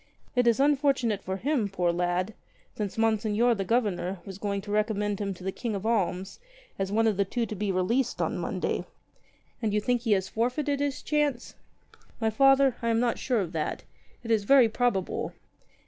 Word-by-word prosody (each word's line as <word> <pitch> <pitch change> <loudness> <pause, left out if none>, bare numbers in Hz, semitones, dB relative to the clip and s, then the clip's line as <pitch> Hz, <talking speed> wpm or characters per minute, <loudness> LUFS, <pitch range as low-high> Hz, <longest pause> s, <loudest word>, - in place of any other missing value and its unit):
It 245 -1 +3
is 235 0 +4
unfortunate 275 -7 +2
for 190 +1 -3
him, 250 -2 0
poor 180 -3 +1
lad, 175 +4 -1 0.4
since 205 -1 -4
Monseigneur 225 +1 +2
the 200 -3 -2
Governor 195 -4 0
was 195 -1 -8
going 200 -1 -2
to 205 +1 -8
recommend 210 -1 0
him 200 -1 -1
to 180 - -13
the 190 - -1
King 225 +1 -4
of 200 +1 -5
Alms 190 - -1 0.4
as 195 0 -1
one 225 +2 +2
of 215 -4 +2
the 200 - +3
two 230 +4 -2
to 215 - -6
be 205 0 -1
released 230 +8 0
on - - 0
Monday." - - -2 0.8
"And 215 -3 0
you - - +3
think 245 +2 0
he 225 -3 +2
has 190 -1 0
forfeited 270 +5 -1
his 285 0 -2
chance?" 295 -5 0 0.7
"My 220 -1 +1
Father, 270 +1 +4
I 230 - 0
am 225 0 +2
not 240 -1 0
sure 245 -5 +1
of 175 -4 -4
that. 160 -3 -3 0.4
It 230 - -4
is 220 -2 +3
very 260 +2 +6
probable." 220 -4 -1
220 Hz, 195 wpm, -27 LUFS, 195-245 Hz, 0.8 s, very